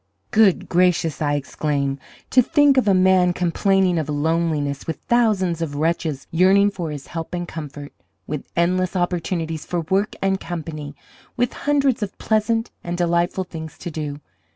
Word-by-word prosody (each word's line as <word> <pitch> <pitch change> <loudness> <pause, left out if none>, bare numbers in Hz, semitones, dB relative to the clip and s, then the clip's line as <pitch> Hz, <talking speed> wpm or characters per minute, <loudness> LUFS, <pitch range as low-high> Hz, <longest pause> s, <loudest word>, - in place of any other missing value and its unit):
'Good 210 -4 +4
gracious!' 170 -3 +2
I 145 -1 +1
exclaimed, 140 -1 -2 0.3
'to 255 - +6
think 290 +1 +4
of 255 - +3
a 200 - +5
man 185 -1 +4
complaining 180 0 +2
of 155 -2 -3
loneliness 150 -1 -1
with 160 - -2
thousands 200 -8 +1
of 150 -3 -3
wretches 155 -2 -1
yearning 195 +4 +4
for 175 -5 -4
his 145 -2 -6
help 165 +1 -5
and 175 0 -4
comfort, 145 -3 -8 0.3
with 150 -2 -5
endless 180 +2 +1
opportunities 170 -3 -1
for 175 -1 -2
work 190 +6 0
and 195 0 +1
company, 155 -4 -6 0.4
with 245 0 +1
hundreds 280 -5 +1
of 205 -2 -4
pleasant 225 +1 0
and 175 0 -3
delightful 175 +1 +1
things 160 -3 -8
to 175 - -6
do. 150 -2 -5
175 Hz, 155 wpm, -22 LUFS, 155-195 Hz, 0.4 s, to